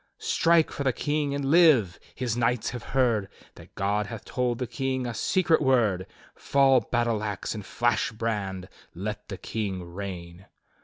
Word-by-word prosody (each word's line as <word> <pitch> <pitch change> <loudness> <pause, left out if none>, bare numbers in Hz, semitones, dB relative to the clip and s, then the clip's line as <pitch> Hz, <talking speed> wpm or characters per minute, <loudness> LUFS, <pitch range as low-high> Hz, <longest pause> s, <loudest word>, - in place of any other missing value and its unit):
"'Strike 165 -1 +3
for 140 - -4
the 135 - +2
King 145 +3 -1
and 140 -1 -2
live! 150 - +5 0.2
His 120 -3 -2
knights 120 0 0
have 125 -1 -6 0.2
heard 115 -6 +2 0.2
That - - -16
God 105 +1 0
hath 115 -1 -8
told 125 -2 -1
the 125 - -2
King 130 0 -2
a 120 - -3
secret 170 +6 +2
word. 115 -9 +2 0.3
Fall 135 -2 +3
battle 120 -3 -1
ax, 105 -3 -3
and 105 -2 -6
flash 120 +4 0
brand! 105 -5 -3 0.3
Let 105 +4 -5
the 95 - -6
King 100 -4 -4
reign! 90 0 -8
115 Hz, 160 wpm, -26 LUFS, 100-130 Hz, 0.3 s, live